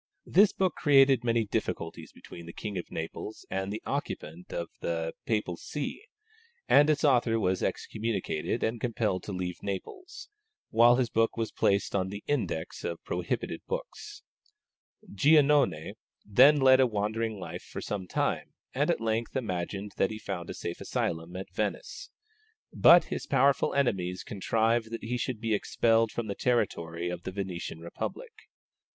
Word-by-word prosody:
This 200 +3 +5
book 185 -3 0
created 135 -4 +5
many 115 -1 +1
difficulties 85 -4 -4
between 85 -1 -12
the 85 - -8
King 105 -2 -5
of 90 - -5
Naples 80 +6 -6
and 95 +1 -2
the 105 - -5
occupant 85 +4 -5
of 85 -1 -3
the 80 -1 -2
Papal 105 -6 -1
See, 150 - -5 0.6
and 145 +1 +6
its 150 +1 +2
author 120 -5 +3
was 95 -3 0
excommunicated 110 -3 -2
and 115 +1 -1
compelled 110 -6 0
to - - -5
leave 90 -2 -4
Naples, 370 - -6 0.4
while 120 +2 +6
his 125 -2 0
work 115 +1 +2
was 115 -1 -2
placed 100 0 +1
on 95 -1 +1
the 100 +1 -7
index 125 - -2
of 85 -1 -4
prohibited - - -3
books. - - -6 0.9
Giannone 140 - +4 0.3
then 130 +9 +6
led 130 -1 +6
a 130 - +5
wandering 110 0 -2
life 90 - -6
for - - -8
some 95 -3 -4
time, - - -1 0.2
and - - +1
at - - +1
length 115 +2 -1
imagined 100 -3 -3
that 95 - +2
he 110 - -5
had 110 - -15
found 85 -1 -4
a - - -5
safe 85 - -5
asylum 80 +2 -2
at 95 +1 -7
Venice. - - -3 0.6
But 170 0 +8
his - - -5
powerful 140 +1 +3
enemies 95 -10 0
contrived 110 +3 0
that 115 0 -6
he 120 +2 -2
should 120 -1 -3
be 115 0 -1
expelled 115 +1 +2
from 120 - -3
the 100 - -3
territory 90 -8 -1
of 90 -1 -5
the 95 - -5
Venetian 90 -4 -5
republic. 85 0 -6
110 Hz, 160 wpm, -29 LUFS, 90-125 Hz, 0.9 s, But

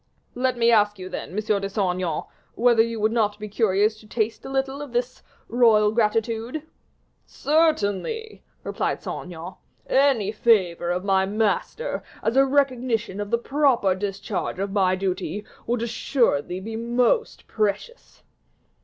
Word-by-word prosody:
"Let 255 0 0
me 235 0 +4
ask 210 -2 +3
you, 185 0 -7
then, - - -6
M. 180 - -10
de 210 -2 0
Saint 200 - -19 0.2
Aignan, 180 -4 -2 0.3
whether 235 -1 +4
you 230 0 -1
would 215 +1 +2
not 210 -3 +1
be 210 0 -6
curious 210 0 +1
to 215 - -17
taste 220 0 -2
a - - -7
little 270 +1 -2
of 285 -4 -8
this 245 +1 -2 0.3
royal 220 -3 +4
gratitude?" 225 +5 0 0.6
"Certainly," 315 - 0 0.2
replied - - -2
Saint - - -5
Aignan, 175 +1 -8 0.3
"any 260 -7 +2
favor 190 -7 +2
of 180 +1 -1
my 190 -1 +2
master, 220 - -1 0.2
as 225 - 0
a 270 0 +6
recognition 250 -7 0
of 205 - -5
the 235 - +2
proper 255 -6 +2
discharge 195 0 -4
of 195 +1 -3
my 190 -2 +2
duty, 190 +2 -3 0.2
would 235 -1 0
assuredly 230 - 0
be 220 +4 -6
most 240 - 0
precious." 215 - -3
220 Hz, 150 wpm, -24 LUFS, 200-245 Hz, 0.6 s, a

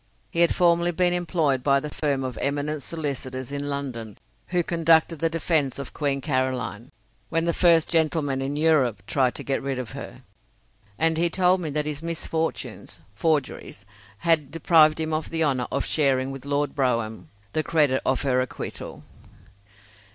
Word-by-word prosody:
He 170 - -1
had 170 - +4
formerly 170 -1 +3
been 175 +1 +2
employed 160 -6 +1
by 140 0 +4
the 150 +1 -6
firm 140 -3 -1
of 130 -1 -4
eminent 145 +1 -2
solicitors 130 -5 -5
in 145 0 -3
London 125 -7 -5 0.3
who 175 -1 0
conducted 165 -1 +3
the 165 - +1
defence 160 -5 0
of 140 -2 -7
Queen 140 -2 -1
Caroline, 130 -4 -2 0.4
when 165 0 0
the 170 - +1
"first 165 -3 +4
gentleman 155 -4 +1
in 135 +2 -3
Europe" 145 -10 +2
tried 130 0 +1
to - - -5
get 135 - -1
rid 135 -1 -3
of 125 -3 -5
her, 135 -1 -9 0.7
and 160 0 +2
he 170 0 +3
told 180 +1 +2
me 160 - -3
that 150 +1 -1
his 150 -1 -3
misfortunes 160 - -3
(forgeries) 150 +4 -2 0.3
had 160 -2 +2
deprived 155 0 +4
him 160 0 -1
of 155 0 -2
the 165 0 +1
honour 130 -5 +1
of - - -1
sharing 135 -3 +1
with 135 0 -8
Lord 145 0 0
Brougham 115 -6 -1 0.2
the 155 - +1
credit 150 -5 +2
of 130 +1 +1
her 130 -2 +2
acquittal. 125 - -6
145 Hz, 165 wpm, -24 LUFS, 130-165 Hz, 0.7 s, had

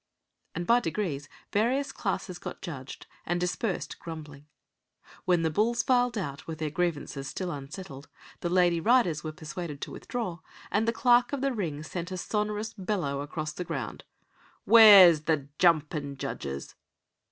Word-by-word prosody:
and 175 +1 -3
by 235 +6 +5
degrees 160 - -3 0.2
various 255 +7 +1
classes 185 -3 -3
got - - -7
judged, 140 -7 -7 0.2
and 175 +1 -1
dispersed 180 +3 -2
grumbling. 150 -3 -9 0.8
Then 175 -2 +3
the 160 - +1
bulls 230 +7 +1
filed 245 -2 +2
out 140 -8 -5
with 160 -1 -5
their 155 -1 -3
grievances 150 -4 -2
still 180 +5 -4
unsettled, 140 0 -8 0.3
the 175 - -2
lady 175 -1 +3
riders 220 - +3
were 155 - -4
persuaded 155 -1 -7
to - - -5
withdraw, 215 -9 -4 0.3
and 220 +2 +1
the - - +4
clerk 245 +2 +3
of 280 - -2
the 275 -1 +1
ring 160 -9 -3
sent 175 +3 -5
a 185 - -3
sonorous 210 +3 -2
bellow 180 -9 -2
across 155 +1 -4
the 180 - -4
ground: - - -5 0.6
"Where's 195 -9 +9
the 145 -4 0
jumpin' 150 -4 +2
judges?" 70 - -5
175 Hz, 150 wpm, -28 LUFS, 150-210 Hz, 0.8 s, Where's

